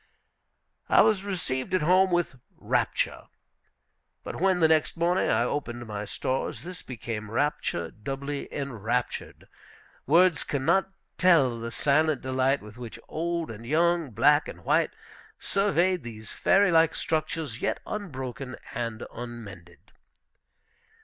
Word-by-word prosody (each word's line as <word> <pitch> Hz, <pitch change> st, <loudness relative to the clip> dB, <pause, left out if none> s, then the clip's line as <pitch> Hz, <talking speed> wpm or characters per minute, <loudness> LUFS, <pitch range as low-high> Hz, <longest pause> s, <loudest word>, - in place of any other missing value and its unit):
I -, -, +7 dB
was 210 Hz, -3 st, +3 dB
received 180 Hz, -5 st, -2 dB
at 185 Hz, -, +1 dB
home 185 Hz, +4 st, +5 dB
with 175 Hz, -7 st, 0 dB, 0.2 s
rapture. -, -, -1 dB, 1.0 s
But -, -, -6 dB
when, 190 Hz, -1 st, +3 dB
the 160 Hz, -, +6 dB
next 160 Hz, +1 st, +2 dB
morning, 175 Hz, +2 st, +2 dB
I -, -, +3 dB
opened 120 Hz, -2 st, -3 dB
my 105 Hz, -1 st, -5 dB
stores, 130 Hz, 0 st, -3 dB
this 180 Hz, +1 st, -8 dB
became 110 Hz, -3 st, -6 dB
rapture 115 Hz, -, -1 dB
doubly 140 Hz, +5 st, -5 dB
enraptured. 125 Hz, -3 st, -3 dB, 0.6 s
Words 170 Hz, +2 st, +5 dB
can 135 Hz, -2 st, -3 dB
not 190 Hz, +4 st, +3 dB, 0.3 s
tell 145 Hz, -10 st, +4 dB
the 115 Hz, 0 st, -4 dB
silent 150 Hz, +3 st, +2 dB
delight 130 Hz, 0 st, +1 dB
with 105 Hz, +2 st, -12 dB
which 120 Hz, -2 st, -7 dB
old 170 Hz, -1 st, -2 dB
and 115 Hz, +1 st, -9 dB
young, 165 Hz, +3 st, +2 dB
black 145 Hz, +7 st, +4 dB
and -, -, -10 dB
white, -, -, +3 dB, 0.5 s
surveyed 190 Hz, -2 st, +1 dB
these 110 Hz, -3 st, -9 dB
fairy 195 Hz, -1 st, +3 dB
like 165 Hz, -1 st, +4 dB
structures, 155 Hz, -5 st, -2 dB
yet -, -, 0 dB
unbroken 135 Hz, -, -5 dB, 0.2 s
and 115 Hz, -1 st, -4 dB
unmended. 100 Hz, -8 st, -10 dB
140 Hz, 130 wpm, -27 LUFS, 120-170 Hz, 1.0 s, I